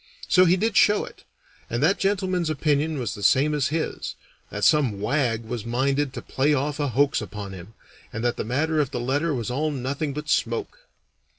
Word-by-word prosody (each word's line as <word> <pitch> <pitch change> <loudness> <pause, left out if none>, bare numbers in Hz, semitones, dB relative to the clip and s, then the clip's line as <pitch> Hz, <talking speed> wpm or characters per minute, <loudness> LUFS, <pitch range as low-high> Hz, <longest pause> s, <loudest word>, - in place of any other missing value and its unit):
So 185 0 +5
he 180 +1 +4
did 220 +2 0
show 210 +1 +4
it, - - -15 0.4
and 120 +4 -1
that 180 +6 +3
gentleman's 185 -4 0
opinion 155 +1 0
was 120 -6 -3
the 105 - -9
same 140 +8 +3
as 145 -3 +1
his 160 +1 -3 0.3
that - - -5
some 135 -10 +3
wag 115 0 0
was 115 -1 -5
minded 135 +4 0
to - - -7
play 145 +3 +1
off 145 +2 -2
a 145 - +1
hoax 140 +2 +2
upon 100 -1 -7
him, 95 +4 -11 0.4
and 115 - -5
that 120 0 +1
the - - -3
matter 155 +7 0
of 145 -4 +1
the 125 - -4
letter 145 +7 0
was 120 -1 -3
all 150 +5 0
nothing 140 +2 -3
but 150 +2 -6
smoke. 115 -5 -1
140 Hz, 200 wpm, -24 LUFS, 120-155 Hz, 0.4 s, So